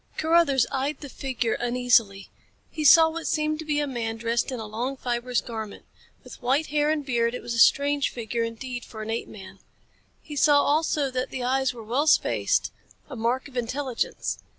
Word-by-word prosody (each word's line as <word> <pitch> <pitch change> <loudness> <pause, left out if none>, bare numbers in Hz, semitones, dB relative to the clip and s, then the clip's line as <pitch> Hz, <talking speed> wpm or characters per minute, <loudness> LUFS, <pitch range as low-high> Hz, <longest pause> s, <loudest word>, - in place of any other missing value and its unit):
Carruthers 315 -6 +3
eyed 275 +2 -2
the 285 - -8
figure 250 -4 -2
uneasily. 240 -5 +1 0.4
He 310 - -4
saw 320 +3 +8
what 330 0 -5
seemed 305 0 0
to 320 - -6
be 295 -1 0
a 295 - 0
man 230 -4 -4
dressed 235 +2 -1
in 255 - -4
a 220 - -5
long, 240 +6 -4
fibrous 245 0 -1
garment. 220 -3 -7 0.4
With - - -12
white 265 +5 +1
hair 295 0 +2
and 305 -2 -1
beard, 235 -2 0
it - - -6
was 240 - -4
a 230 - -2
strange 285 +3 +4
figure 235 0 -4
indeed 240 +2 -5
for 220 -1 -8
an 220 - -5
apeman. 215 -3 -7 0.6
He 300 - -9
saw 285 0 +4
also 295 -2 +1
that 255 0 -2
the 255 - -5
eyes 265 +1 +1
were 230 - -9
well 255 +8 0
spaced, - - +2 0.4
a - - -5
mark 240 +4 -1
of 275 - -17
intelligence. 250 +1 -3
255 Hz, 190 wpm, -25 LUFS, 235-290 Hz, 0.6 s, saw